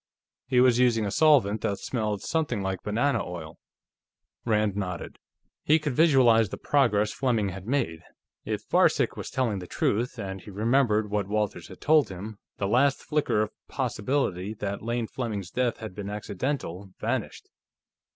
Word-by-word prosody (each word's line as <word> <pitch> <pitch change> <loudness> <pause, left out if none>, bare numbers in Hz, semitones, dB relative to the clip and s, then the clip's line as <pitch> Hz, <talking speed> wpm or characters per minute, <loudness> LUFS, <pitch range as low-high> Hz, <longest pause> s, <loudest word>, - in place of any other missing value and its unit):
He 125 -1 +3
was 125 -1 +5
using 120 -3 +3
a 100 - -2
solvent 125 -9 +4
that 100 - -1
smelled 105 -4 -2
something 150 -11 -1
like 95 0 -2
banana 120 +4 0
oil." 85 -3 -8 0.9
Rand 105 -3 +1
nodded. 90 -4 -5 0.4
He 155 - +5
could 150 -3 -2
visualize 125 - +5
the - - -6
progress 110 -7 +2
Fleming 115 -7 0
had 95 +2 -8
made. 80 - -1 0.4
If - - -4
Varcek - - +3
was - - -6
telling 120 -6 -1
the 90 - -8
truth, 120 +8 -1
and 95 -3 -5
he - - -12
remembered 110 0 +1
what 105 -2 0
Walters 105 0 -2
had - - -13
told 155 -1 +4
him, 100 +3 -8 0.2
the 100 - -1
last 135 +6 +2
flicker 150 -8 +1
of 105 - -5 0.2
possibility 110 -5 -1
that 100 -1 -4
Lane 115 +1 -1
Fleming's 105 -6 -4
death 125 -2 0
had 110 -4 -7
been 100 +1 -6
accidental 100 - -4
vanished. - - -3
110 Hz, 160 wpm, -27 LUFS, 100-130 Hz, 0.9 s, was